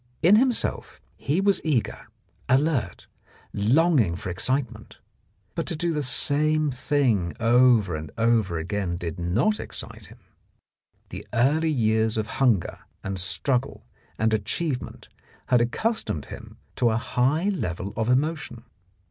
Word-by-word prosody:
In 190 +6 +7
himself 250 0 0 0.2
he 145 +6 -1
was 200 0 +2
eager, 145 -8 -1 0.4
alert, 130 - 0 0.5
longing 120 - +2
for 95 +1 -5
excitement, 120 +3 -2 0.6
but - - -4
to - - -2
do 170 +2 -1
the 150 - -1
same 150 +2 +2
thing 130 -9 0
over 115 -5 +4
and 75 0 -6
over 115 -6 +1
again 90 +2 -3
did 85 0 -5
not 115 - +1
excite 110 -3 -7
him; 110 +5 -16 0.9
the - - -8
early 150 +7 +2
years 110 -5 +1
of 110 - 0 0.2
hunger 115 -9 +2 0.2
and 95 -1 -3
struggle 120 +10 -1 0.3
and 110 0 +1
achievement 125 - -3 0.4
had 125 -1 +4
accustomed 120 - -1
him - - -11 0.2
to 120 - +3
a 110 - 0
high 135 - 0
level 100 - -3
of 110 +1 -1
emotion. 145 -2 -1
120 Hz, 130 wpm, -25 LUFS, 105-150 Hz, 0.9 s, In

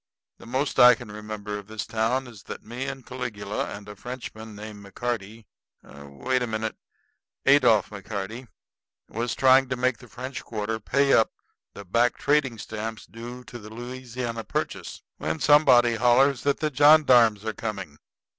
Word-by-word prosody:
The - - -13
most 135 +4 -1
I 125 0 +9
can 120 -4 -10
remember 105 -1 -6
of 100 - -13
this 110 -1 -5
town 115 +4 0
is 115 -5 -12
that - - -8
me 120 +4 -5
and 135 -2 -6
Caligula 120 -5 -4
and 100 0 -8
a 105 - -9
Frenchman 110 -1 -8
named 105 -1 -9
McCarty 110 +1 -5 0.4
wait 70 - -3
a 125 - -1
minute; 110 0 -3 0.7
Adolph 120 -8 +5
McCarty 105 +4 -6 0.6
was 115 +2 -2
trying 130 0 +5
to 130 - 0
make 125 -1 0
the 120 - -14
French 130 +3 -7
Quarter 110 0 -3
pay 140 +5 +2
up 110 - +4 0.4
the 100 - -9
back 115 +6 +2
trading 145 -5 +1
stamps 110 +1 -6
due 120 +2 -9
on - - -29 0.2
the 105 - -10
Louisiana 120 0 -5
Purchase, - - -4
when 80 +1 -3
somebody 130 -5 +5
hollers 125 +3 +4
that 140 -1 0
the 155 -1 0
johndarms 125 -7 +6
are 110 - -2
coming. 100 -10 -6
115 Hz, 160 wpm, -25 LUFS, 105-130 Hz, 0.7 s, I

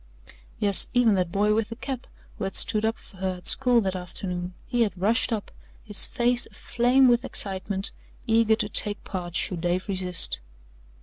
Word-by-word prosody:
Yes, 200 -3 +2
even 240 -3 +4
that 180 -3 -1
boy 210 +2 +2
with 220 0 -1
the 230 - -6
cap 260 0 -6 0.3
who - - -2
had 195 - -5
stood 215 0 +3
up 225 +1 -1
for 190 - -18
her 185 0 -2
at 180 - -16
school 250 -3 +4
that 190 -2 -2
afternoon 180 0 -5
he 245 -1 -1
had 205 -5 0
rushed 225 +6 +1
up, 215 -3 -3 0.3
his 210 -2 +4
face 245 0 +1
aflame 250 +2 +2
with 240 -1 +3
excitement, 195 0 0 0.3
eager 225 -1 +3
to 210 - -1
take 205 0 -1
part 175 -2 -6
should 175 -3 -1
Dave 175 +3 -1
resist. 180 - +2
205 Hz, 180 wpm, -25 LUFS, 185-230 Hz, 0.3 s, even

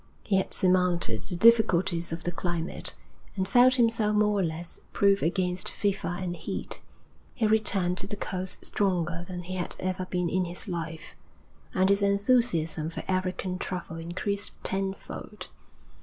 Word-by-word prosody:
He 195 - +2
had 190 - 0
surmounted 180 - +2
the 180 - -4
difficulties 190 -5 +4
of 165 +1 -4
the 175 - -1
climate, 175 -1 -3 0.4
and 190 -1 -1
felt 250 +5 +6
himself 230 -3 +2
more 210 -1 +3
or - - +2
less 165 +1 -3
proof 200 0 +4
against 180 +1 0
fever 195 -3 -1
and 180 -2 -3
heat. - - -4 0.5
He 225 - +1
returned 200 -4 +2
to 195 - -3
the 205 - -3
coast 185 -2 -4
stronger 175 -4 0
than 180 -1 -6
he 185 +2 -6
had 175 - -3
ever 185 0 -2
been 180 -1 -1
in 185 +2 +1
his 175 +4 -5
life, 165 -2 -5 0.6
and 185 0 +4
his 200 +1 +3
enthusiasm 200 -7 +2
for 165 - -6
African 185 0 -1
travel 175 -3 -4
increased 185 +5 -3
tenfold. 195 0 -4
185 Hz, 155 wpm, -28 LUFS, 175-200 Hz, 0.6 s, felt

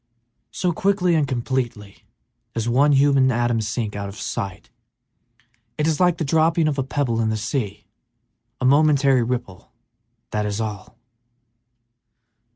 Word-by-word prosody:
So 180 - -1
quickly 185 0 +1
and 155 -3 +2
completely 120 -5 -3 0.5
does 115 0 -2
one 135 +5 +3
human 135 -1 +4
atom 120 -1 0
sink 110 0 -3
out 100 -1 -4
of 100 - -10
sight! 100 0 -5 1.1
It 150 - 0
is 160 -2 0
like 175 -2 +3
the 160 - -2
dropping 160 +2 +2
of 145 -2 -1
a - - +1
pebble 130 -4 -1
in 110 - +1
the 110 - -1
sea: 110 -2 -3 0.7
a 130 - -1
momentary 140 -2 +4
ripple, 115 -6 -4 0.6
that 105 0 -1
is 105 +1 -3
all! 105 -4 -6
130 Hz, 140 wpm, -22 LUFS, 110-150 Hz, 1.1 s, human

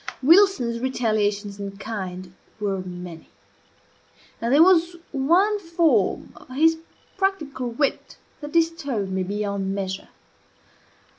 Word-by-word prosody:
Wilson's 325 -8 +4
retaliations 210 -5 -1
in 200 0 -6
kind 185 -4 -6 0.3
were 200 -2 -1
many; 180 -2 -9 1.1
and 230 +1 -1
there 295 +4 +7
was 345 -1 +4 0.2
one 350 +10 +2
form 335 -3 +1
of - - -16
his 320 +3 +4 0.4
practical 305 -10 -1
wit 275 +4 -2 0.2
that 295 -1 -8
disturbed 310 - 0
me 190 0 -1
beyond 200 0 -2
measure. 190 -1 -4
235 Hz, 105 wpm, -23 LUFS, 200-325 Hz, 1.1 s, there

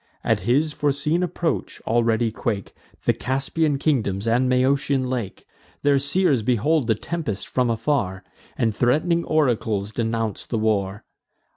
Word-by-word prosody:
At - - +2
his 150 +5 +2
foreseen 150 +4 0
approach, 175 -1 -2
already 115 0 +1
quake 105 -3 -3 0.3
The - - +4
Caspian 140 +3 0
kingdoms 115 -9 0
and 125 +3 +2
Maeotian 130 +1 +2
lake: 120 -7 -4 0.4
Their 140 -1 +4
seers 140 -1 +2
behold 125 +5 +1
the 110 - +3
tempest 115 - -4
from 125 -2 0
afar, 115 -5 -1 0.3
And 115 -2 +1
threat'ning 155 +9 +2
oracles 115 -9 0
denounce 115 -2 -2
the 115 - -2
war. 105 -2 0
125 Hz, 130 wpm, -23 LUFS, 110-145 Hz, 0.4 s, The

